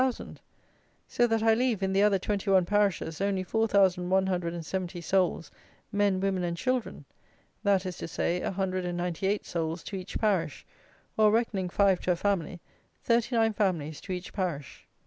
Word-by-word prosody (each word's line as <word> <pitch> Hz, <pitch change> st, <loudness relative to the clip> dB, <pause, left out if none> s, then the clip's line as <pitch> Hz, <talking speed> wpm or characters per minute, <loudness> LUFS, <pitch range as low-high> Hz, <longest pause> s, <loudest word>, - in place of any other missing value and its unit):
So 240 Hz, -, +2 dB
that 225 Hz, -1 st, 0 dB
I 225 Hz, 0 st, +5 dB
leave, 230 Hz, -4 st, 0 dB
in 190 Hz, 0 st, 0 dB
the 195 Hz, -, +3 dB
other 205 Hz, -1 st, +4 dB
twenty 200 Hz, +1 st, -2 dB
one 190 Hz, -2 st, +5 dB
parishes, 195 Hz, -4 st, 0 dB
only 195 Hz, -1 st, 0 dB
4,170 185 Hz, -3 st, 0 dB
souls, 180 Hz, -1 st, 0 dB, 0.4 s
men, 205 Hz, -2 st, +2 dB
women, 190 Hz, -1 st, 0 dB
and 170 Hz, -1 st, -2 dB
children! 255 Hz, +1 st, -2 dB, 0.6 s
That 200 Hz, -2 st, +2 dB
is 180 Hz, -1 st, -5 dB
to -, -, -5 dB
say, 175 Hz, +2 st, -1 dB
a -, -, -1 dB
hundred 185 Hz, -1 st, -2 dB
and 175 Hz, -1 st, -3 dB
ninety 175 Hz, +1 st, -2 dB
eight 205 Hz, +1 st, 0 dB
souls 165 Hz, 0 st, -3 dB
to 200 Hz, -, -6 dB
each 185 Hz, +1 st, -5 dB
parish; 185 Hz, -, 0 dB, 0.5 s
or, 215 Hz, -1 st, +6 dB
reckoning 210 Hz, -5 st, 0 dB
five 195 Hz, 0 st, +3 dB
to 180 Hz, -, 0 dB
a -, -, -2 dB
family, 180 Hz, -2 st, -1 dB, 0.4 s
thirty 235 Hz, +1 st, +1 dB
nine 225 Hz, -1 st, +3 dB
families 170 Hz, -8 st, -1 dB
to -, -, -8 dB
each 180 Hz, 0 st, -5 dB
parish. 170 Hz, -8 st, -4 dB
190 Hz, 165 wpm, -28 LUFS, 175-205 Hz, 0.6 s, or